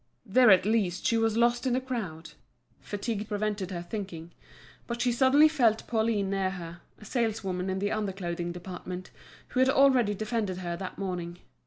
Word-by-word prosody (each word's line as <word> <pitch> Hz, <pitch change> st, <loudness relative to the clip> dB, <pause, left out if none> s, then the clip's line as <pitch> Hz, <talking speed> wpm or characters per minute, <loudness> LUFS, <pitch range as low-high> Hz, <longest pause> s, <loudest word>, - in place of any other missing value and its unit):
There 245 Hz, +3 st, +5 dB
at 190 Hz, -1 st, +6 dB
least 200 Hz, -5 st, 0 dB
she 230 Hz, -, +3 dB
was 225 Hz, -1 st, +1 dB
lost 240 Hz, +2 st, +2 dB
in 250 Hz, -, +1 dB
the 255 Hz, -, +2 dB
crowd. 220 Hz, -12 st, -5 dB, 0.5 s
Fatigue 210 Hz, 0 st, -4 dB
prevented 210 Hz, -3 st, -2 dB
her 175 Hz, -2 st, -5 dB
thinking. 175 Hz, -4 st, -6 dB, 0.6 s
But 235 Hz, 0 st, -4 dB
she 245 Hz, 0 st, +2 dB
suddenly 265 Hz, +5 st, +5 dB
felt 240 Hz, -8 st, +2 dB
Pauline 220 Hz, -4 st, 0 dB
near 195 Hz, -1 st, 0 dB
her, 175 Hz, -2 st, -8 dB, 0.2 s
a 215 Hz, -, -14 dB
saleswoman 200 Hz, -6 st, -1 dB
in 190 Hz, -, -1 dB
the 205 Hz, +1 st, -1 dB
under 215 Hz, -2 st, -1 dB
clothing 175 Hz, -2 st, -4 dB
department, 180 Hz, +1 st, -7 dB, 0.4 s
who 255 Hz, -, -2 dB
had 260 Hz, 0 st, +5 dB
already 260 Hz, -6 st, +4 dB
defended 215 Hz, -3 st, -2 dB
her 175 Hz, -2 st, -4 dB
that 185 Hz, +1 st, -7 dB
morning. 175 Hz, -3 st, -4 dB
205 Hz, 175 wpm, -28 LUFS, 185-235 Hz, 0.6 s, at